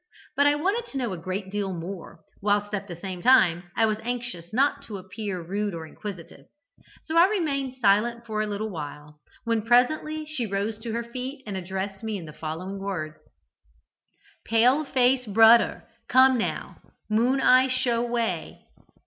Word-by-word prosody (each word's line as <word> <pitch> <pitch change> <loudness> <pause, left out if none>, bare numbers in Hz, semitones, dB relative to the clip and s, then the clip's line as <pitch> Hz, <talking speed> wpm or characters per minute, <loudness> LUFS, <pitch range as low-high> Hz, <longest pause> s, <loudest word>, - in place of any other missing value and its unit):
But 285 +1 +4
I 290 - +4
wanted 400 +10 -1
to - - -6
know 240 -6 -2
a - - -3
great 185 +3 -4
deal 200 -2 -2
more, 175 +1 -8 0.2
whilst 205 0 +1
at 200 -1 -3
the 175 - -7
same 180 +1 -6
time 175 -8 +4
I 225 - +5
was 215 -1 -1
anxious 240 -8 -5
not 280 +4 +2
to 210 - -6
appear 190 +1 -5
rude 200 +2 -2
or 165 -1 -6
inquisitive. 185 +1 -9 0.6
So 320 0 -2
I 345 +2 +8
remained 275 -10 -1
silent 235 +2 +2
for 215 -2 -2
a 215 - -1
little 210 +1 -3
while, 150 -2 -8 0.2
when 230 -1 0
presently 305 +7 +2
she 295 -7 -3
rose 205 +2 -2
to 225 0 -5
her 235 +1 -2
feet 255 +4 -6
and 205 -3 -5
addressed 190 +1 -4
me 220 -2 -2
in 175 - -8
the 155 - -10
following 165 +6 -5
words: 165 -6 -4 1.3
"'Pale 250 +7 +3
face 255 -2 +2
broder 225 +3 +5 0.2
come 260 0 +6
now. 230 - -3 0.3
"Moon 240 +5 +2
eye" 255 0 +5
show 250 -2 +1
way.' 235 -1 -2
220 Hz, 170 wpm, -26 LUFS, 195-255 Hz, 1.3 s, I